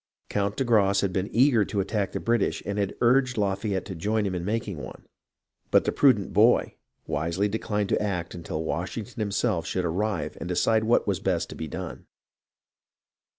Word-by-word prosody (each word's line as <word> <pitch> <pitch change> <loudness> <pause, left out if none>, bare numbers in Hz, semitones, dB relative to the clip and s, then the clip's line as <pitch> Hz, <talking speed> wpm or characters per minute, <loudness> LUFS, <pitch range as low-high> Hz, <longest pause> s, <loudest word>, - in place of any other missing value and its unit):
Count 100 0 -1
de - - +1
Grasse 100 -5 +3
had 100 -2 -1
been 95 +2 -1
eager 120 -3 +4
to 100 0 -3
attack 100 0 -1
the - - -3
British 115 -3 0
and 100 0 -2
had 100 -2 -1
urged 125 +1 +3
Lafayette 100 -1 -1
to 95 - -6
join 105 +5 0
him 95 - -1
in 90 -1 -3
making 105 -2 -2
one; 70 - -9 0.6
but - - +4
the - - 0
prudent 115 -9 +3
"boy" - - +4 0.3
wisely 85 +6 -1
declined 105 -1 -2
to - - +1
act 90 -5 -2
until 80 -2 -4
Washington 105 - -4
himself 105 -3 0
should 90 -1 -1
arrive 100 +6 -2
and 85 - -5
decide 110 +5 +2
what 115 - +3
was 100 -3 0
best 95 -3 -1
to - - -7
be 80 - -5
done. - - -7
100 Hz, 185 wpm, -26 LUFS, 90-110 Hz, 0.6 s, eager